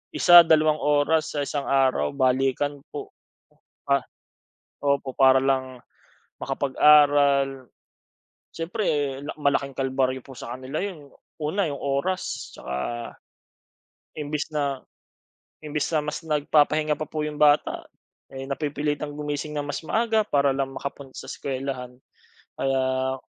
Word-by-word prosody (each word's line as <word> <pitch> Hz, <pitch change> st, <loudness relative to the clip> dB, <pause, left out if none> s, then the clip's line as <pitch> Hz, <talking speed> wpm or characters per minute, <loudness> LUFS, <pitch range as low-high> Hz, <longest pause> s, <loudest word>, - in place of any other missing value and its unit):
1, 175 Hz, 0 st, +9 dB
dalawang 155 Hz, -2 st, +3 dB
oras 150 Hz, +2 st, +1 dB
sa 145 Hz, -, 0 dB
isang 145 Hz, -1 st, -3 dB
araw, 135 Hz, -1 st, +2 dB
balikan 135 Hz, +2 st, +1 dB
po. 410 Hz, -1 st, -7 dB, 0.8 s
Ah, -, -, +4 dB, 0.8 s
opo, 140 Hz, -2 st, 0 dB
para 130 Hz, 0 st, +6 dB
lang 130 Hz, -2 st, -1 dB, 0.6 s
makapag-aral, 140 Hz, -1 st, +3 dB, 0.9 s
siyempre 160 Hz, -, -2 dB
la 145 Hz, -, -5 dB
malaking 140 Hz, -2 st, 0 dB
kalbaryo 130 Hz, -1 st, 0 dB
po 135 Hz, -, -11 dB
sa 120 Hz, +1 st, -7 dB
kanila 130 Hz, +5 st, -4 dB
'yon. 155 Hz, -9 st, -7 dB, 0.3 s
Una, 165 Hz, +5 st, 0 dB
'yong 140 Hz, -, -5 dB
oras, 140 Hz, +7 st, -2 dB
tsaka 65 Hz, -, -6 dB, 1.4 s
imbis 150 Hz, +1 st, -3 dB
na 140 Hz, -3 st, -1 dB, 0.8 s
imbis 150 Hz, -1 st, -2 dB
na 155 Hz, -, +3 dB
mas 150 Hz, 0 st, -4 dB
nagpapahinga 150 Hz, 0 st, +2 dB
pa 155 Hz, -, -2 dB
po 155 Hz, -1 st, -3 dB
'yong 150 Hz, -1 st, -5 dB
bata, 150 Hz, 0 st, +3 dB, 0.5 s
eh, 135 Hz, 0 st, -6 dB
napipilitang 145 Hz, +1 st, -2 dB
gumising 150 Hz, 0 st, -4 dB
ng 145 Hz, -, -2 dB
mas 145 Hz, -, -4 dB
maaga 220 Hz, +2 st, +1 dB
para 140 Hz, -4 st, +2 dB
lang 135 Hz, -1 st, -2 dB
makapunta 140 Hz, -1 st, -7 dB
sa -, -, -8 dB
eskwelahan. 130 Hz, -2 st, -5 dB, 0.6 s
Kaya 130 Hz, 0 st, 0 dB
145 Hz, 120 wpm, -25 LUFS, 135-150 Hz, 1.4 s, 1